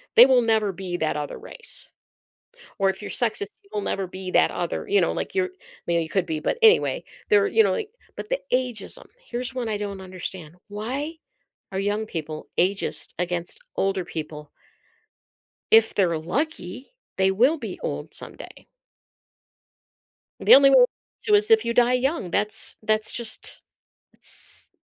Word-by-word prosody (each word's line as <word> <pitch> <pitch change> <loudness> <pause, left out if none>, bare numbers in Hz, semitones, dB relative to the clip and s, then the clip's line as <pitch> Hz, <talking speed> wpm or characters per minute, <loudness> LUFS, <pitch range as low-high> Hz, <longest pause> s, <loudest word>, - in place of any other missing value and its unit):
they 240 - +11
will 260 -2 +5
never 220 -3 +2
be 185 -1 -5
that 155 -2 -1
other 145 -1 -4
race. 475 - -9 0.9
Or 195 0 +3
if 190 - -6
you're 210 - -6
sexist, 215 -4 -2
you 200 - -25
will 210 - -1
never 195 -1 -2
be 185 0 -7
that - - +4
other. - - -3
You 405 +1 +4
know, - - +1
like, - - -4
you're 375 -1 +1 0.4
maybe 170 -1 +2
you 160 - -6
could 190 - +1
be, 155 -1 -2
but, 480 - -1
anyway, 460 +2 +5 0.3
they're, 415 0 +5
you 445 +2 +4
know, - - +2
like 435 -3 -2 0.3
but - - -6
the - - 0
ageism, 250 -4 -1 0.2
here's 250 +2 -4
one 245 -3 -2
I 210 - -1
don't 200 -2 -5
understand: 180 -3 -7
why 255 +10 -4 0.6
are 190 - -1
young 205 +2 -1
people 155 -5 -6
ageist 195 +2 0
against 175 - -2 0.2
older 195 -2 0
people? 150 -2 -7 1.2
If 225 0 +6
they're 175 -5 +2
lucky, 255 - -3 0.3
they 190 0 +4
will 255 +11 +3
be - - -6
old - - -4
someday. - - -9 1.7
The - - +8
only 275 0 +7
way - - +6
not - - +7 0.4
to, 425 - +2
is 420 +2 +2
if 445 -1 +6
you 235 - 0
die 245 +1 +4
young, 250 - 0
that's 210 0 +1
that's 215 0 +1
just 235 -2 -4 0.5
it's - - -1
215 Hz, 165 wpm, -24 LUFS, 185-265 Hz, 1.7 s, they